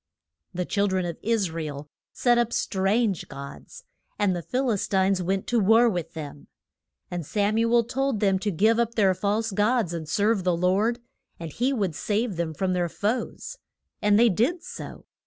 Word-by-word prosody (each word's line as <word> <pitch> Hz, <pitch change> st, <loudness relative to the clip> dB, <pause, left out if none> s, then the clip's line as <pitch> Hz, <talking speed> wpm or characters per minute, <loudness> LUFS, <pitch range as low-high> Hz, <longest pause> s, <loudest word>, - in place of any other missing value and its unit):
The 180 Hz, -1 st, -3 dB
chil 200 Hz, +2 st, +1 dB
dren 190 Hz, -2 st, 0 dB
of 170 Hz, -2 st, -5 dB
Is 215 Hz, -6 st, 0 dB
ra 165 Hz, 0 st, -4 dB
el 145 Hz, -1 st, -6 dB, 0.2 s
set 240 Hz, -1 st, +2 dB
up 235 Hz, -1 st, +1 dB
strange 195 Hz, -1 st, 0 dB
gods, 140 Hz, -, -10 dB, 0.3 s
and 200 Hz, -3 st, +1 dB
the 175 Hz, -, -3 dB
Phil 255 Hz, +7 st, -1 dB
is 205 Hz, -, -1 dB
tines 190 Hz, -1 st, +2 dB
went 190 Hz, +2 st, -1 dB
to 240 Hz, -, +1 dB
war 225 Hz, +4 st, +5 dB
with 180 Hz, -7 st, -2 dB
them. 145 Hz, -2 st, -8 dB, 0.6 s
And 175 Hz, -1 st, -3 dB
Sam 205 Hz, +7 st, 0 dB
u 230 Hz, 0 st, +1 dB
el 235 Hz, -1 st, +5 dB
told 265 Hz, 0 st, -1 dB
them 195 Hz, -2 st, +2 dB
to 210 Hz, -, -1 dB
give 215 Hz, +6 st, +2 dB
up 235 Hz, 0 st, 0 dB
their 195 Hz, -4 st, +4 dB
false 210 Hz, +4 st, -1 dB
gods 210 Hz, -2 st, +1 dB
and 160 Hz, -2 st, -5 dB
serve 205 Hz, +1 st, +1 dB
the 180 Hz, -2 st, +1 dB
Lord, 195 Hz, +7 st, +2 dB, 0.4 s
and 165 Hz, -3 st, -7 dB
he 250 Hz, +3 st, 0 dB
would 200 Hz, -, -1 dB
save 210 Hz, -, -1 dB
them 165 Hz, -2 st, -3 dB
from 185 Hz, +3 st, 0 dB
their 175 Hz, -1 st, 0 dB
foes. 235 Hz, -, -3 dB, 0.4 s
And 205 Hz, 0 st, +4 dB
they 235 Hz, +1 st, +6 dB
did 255 Hz, -, 0 dB
so. -, -, -9 dB
200 Hz, 195 wpm, -25 LUFS, 180-230 Hz, 0.6 s, they